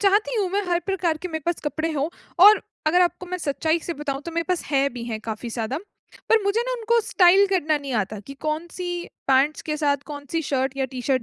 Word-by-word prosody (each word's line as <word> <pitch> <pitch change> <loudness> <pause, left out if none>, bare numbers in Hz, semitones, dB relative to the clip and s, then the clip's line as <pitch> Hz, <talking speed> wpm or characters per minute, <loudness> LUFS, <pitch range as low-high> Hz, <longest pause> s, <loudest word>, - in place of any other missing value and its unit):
चाहती 415 +4 +3
हूँ 380 - 0
मैं, 405 +2 0
हर 345 0 +2
प्रकार 360 -5 0
के 365 - -3
मेरे 315 -2 -4
पास 345 - 0
कपड़े 315 +2 -1
हों 290 +1 0 0.4
और 420 +1 +8 0.2
अगर 355 +3 +4
आपको 355 +1 -1
मैं 365 0 -4
सच्चाई 315 +2 0
से 335 +1 -5
बताऊँ, 280 -1 -3
तो 335 - -6
मेरे 335 0 -1
पास 360 -2 0
हैं 275 -2 +2
भी 240 -1 -6
हैं 220 -2 -4
काफ़ी 220 +2 -5
ज़्यादा। 230 +5 -2 0.5
पर 450 -2 +4
मुझे 400 +3 +1
ना - - -1
उनको 470 -1 +2
स्टाइल 385 +2 +6
करना 320 -6 +1
नहीं 280 -2 -6
आता 210 0 -1
कि 275 - -8
कौन-सी 330 +4 -3 0.4
पैंट्स 270 +3 +3
के 305 -1 -2
साथ 290 -2 +2
कौन-सी 290 +2 -4
शर्ट 270 -1 -1
या 270 - 0
टी-शर्ट 255 0 0
315 Hz, 225 wpm, -24 LUFS, 275-365 Hz, 0.5 s, और